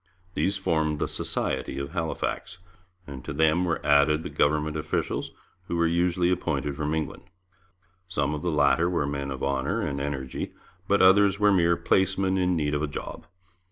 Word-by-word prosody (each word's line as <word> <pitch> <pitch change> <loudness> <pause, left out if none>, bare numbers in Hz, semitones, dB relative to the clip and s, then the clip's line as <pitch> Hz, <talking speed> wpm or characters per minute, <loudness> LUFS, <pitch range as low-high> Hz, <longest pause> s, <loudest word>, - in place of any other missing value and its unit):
These 100 +2 0
formed 80 -5 0
the - - -1
'Society' - - -2
of 70 0 -4
Halifax, 80 +1 -3 0.5
and 70 -3 -9
to - - -5
them 80 +3 +2
were 85 -2 0
added 75 +2 +4
the - - -6
government 75 +1 +1
officials, 75 -1 -2 0.4
who - - -2
were 85 - +3
usually 85 +1 +2
appointed 75 -5 -1
from 75 +1 -1
England. 80 -2 -4 0.8
Some 75 -5 -1
of 75 - -4
the 90 - -1
latter 75 +2 +3
were 85 -5 0
men 70 -1 -3
of 65 -1 -5
honour 70 0 0
and 70 -1 -2
energy, 70 -2 -4 0.3
but 100 -1 +3
others 100 +1 +5
were 105 -1 +5
mere 85 -2 +3
placemen 95 0 +1
in 90 -1 +2
need 75 -2 0
of 75 - 0
a 75 - 0
job. 70 - -7
80 Hz, 175 wpm, -26 LUFS, 70-90 Hz, 0.8 s, others